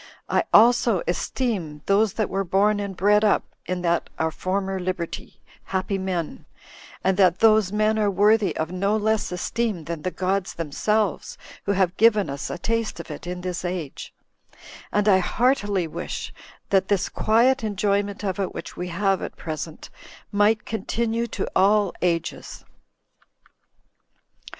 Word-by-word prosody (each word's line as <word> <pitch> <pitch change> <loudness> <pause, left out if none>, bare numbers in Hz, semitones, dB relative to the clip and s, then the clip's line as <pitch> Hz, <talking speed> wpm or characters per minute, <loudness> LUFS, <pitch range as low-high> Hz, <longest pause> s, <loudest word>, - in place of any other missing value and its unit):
I - - +1
also 235 -3 +5
esteem 175 - -2
those 205 +1 +3
that 220 -3 -1
were 195 +1 -1
born 200 +3 +2
and 200 -2 -5
bred 210 +2 +4
up 210 - +3 0.2
in 180 0 -2
that 170 -1 0
our 160 0 0
former 190 +2 -2
liberty 180 -2 -5 0.2
happy 195 +1 -2
men, 180 -4 -4 0.6
and 190 0 +2
that 185 -3 +4
those 215 -3 +4
men 215 +1 +1
are 210 -1 +2
worthy 205 +2 +3
of 160 +2 -2
no 200 +4 +1
less 220 -1 0
esteem 205 0 -2
than 165 0 -5
the 185 - -1
gods 190 +1 -2
themselves 200 +6 -1 0.3
who 200 - +1
have 185 -2 +1
given 215 -7 +4
us 140 +1 -5
a - - -4
taste 230 +1 -2
of 170 - -8
it 150 +3 -8
in 180 0 -4
this 180 -1 -4
age; 175 -6 -5 0.8
and 210 0 +1
I 190 -2 +6
heartily 205 -2 +1
wish 160 - -5 0.4
that 190 -1 +3
this 200 -3 +1
quiet 240 +4 +2
enjoyment 205 -1 -1
of 195 -1 -2
it, 195 - -2
which - - -7
we 180 - -4
have 195 +2 0
at - - -6
present, 155 -1 -6 0.4
might 210 +1 +2
continue 230 +1 -2
to - - -4
all 200 0 +3
ages. 170 -2 -2
195 Hz, 150 wpm, -24 LUFS, 180-215 Hz, 0.8 s, I